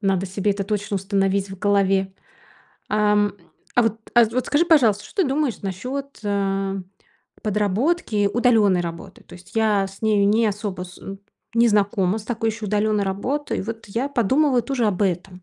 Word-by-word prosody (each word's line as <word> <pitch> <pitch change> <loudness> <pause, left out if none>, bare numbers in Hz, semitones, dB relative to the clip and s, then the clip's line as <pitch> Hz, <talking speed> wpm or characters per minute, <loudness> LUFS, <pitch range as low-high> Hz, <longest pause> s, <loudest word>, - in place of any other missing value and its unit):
Надо 195 -2 0
себе 195 +2 -1
это 200 0 -2
точно 205 0 -2
установить 195 0 0
в 190 - -8
голове. 195 -1 +2 0.8
А, 210 0 +2
м, 205 -1 +1 0.4
а 245 - +5
вот, 225 0 -1
а, 240 -1 +7
вот 240 +3 -2
скажи, 295 +4 +2
пожалуйста, 245 - +4
что 390 - -1
ты 295 - 0
думаешь 275 -5 -1
насчёт, 255 +9 -5
а, 195 -1 -1 0.7
подработки, 210 - +1
удалённой 220 -7 +3
работы? 170 -1 -7
То - - -14
есть 180 +1 -15
я 210 -3 +2
с 195 +2 -14
нею 210 -2 +3
не 220 +2 +3
особо 200 -3 -3
с 180 0 -13
м, 195 0 -8 0.4
не 235 0 +4
знакома 205 -1 +1
с 215 - -10
такой 225 -1 -1
ещё 220 -1 -6
удалённой 210 0 +1
работой. 250 +10 -2
Вот 225 +1 -7
я 235 +7 -2
подумываю 265 +1 +2
тоже 245 -2 -1
об 205 -1 0
этом. 180 -1 -2
205 Hz, 175 wpm, -22 LUFS, 195-230 Hz, 0.8 s, а